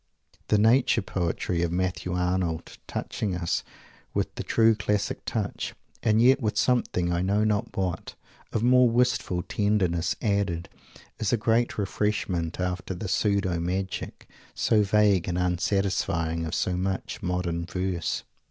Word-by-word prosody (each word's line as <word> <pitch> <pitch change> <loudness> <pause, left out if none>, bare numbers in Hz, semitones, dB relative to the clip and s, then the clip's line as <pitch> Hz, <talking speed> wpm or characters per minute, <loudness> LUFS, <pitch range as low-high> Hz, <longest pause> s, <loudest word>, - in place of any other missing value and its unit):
The 105 - +3
direct 105 - +3
Nature 120 0 +4
poetry 90 -2 -1
of 85 -1 0
Matthew 90 0 -1
Arnold, 90 -2 -1
touching 100 -4 -3
us 85 -1 -1 0.5
with - - -1
the - - -5
true 115 0 +4
classic 105 -1 -1
touch, - - -3 0.3
and 110 -1 +3
yet 130 +4 +5
with 105 -3 -1
something, 90 -8 +1
I 85 - 0
know 100 +3 +2
not 110 +1 -1
what, 95 -3 -2 0.4
of 110 - -1
more 125 0 +6
wistful 115 -7 +1
tenderness 90 -5 +1
added, 100 -5 0 0.5
is 110 - 0
a 120 - +3
great 115 +2 +1
refreshment 95 -5 -1
after 90 +1 -2
the 95 +4 -5
pseudo 100 -2 +1
magic, 95 +2 -3 0.3
so 110 -2 +3
vague 100 -3 +3
and 90 -1 -1
unsatisfying, 85 -2 0
of 80 - -3
so 90 - 0
much 95 +1 -3
modern 90 -1 -1
verse. 90 -3 -2
95 Hz, 145 wpm, -26 LUFS, 90-105 Hz, 0.5 s, more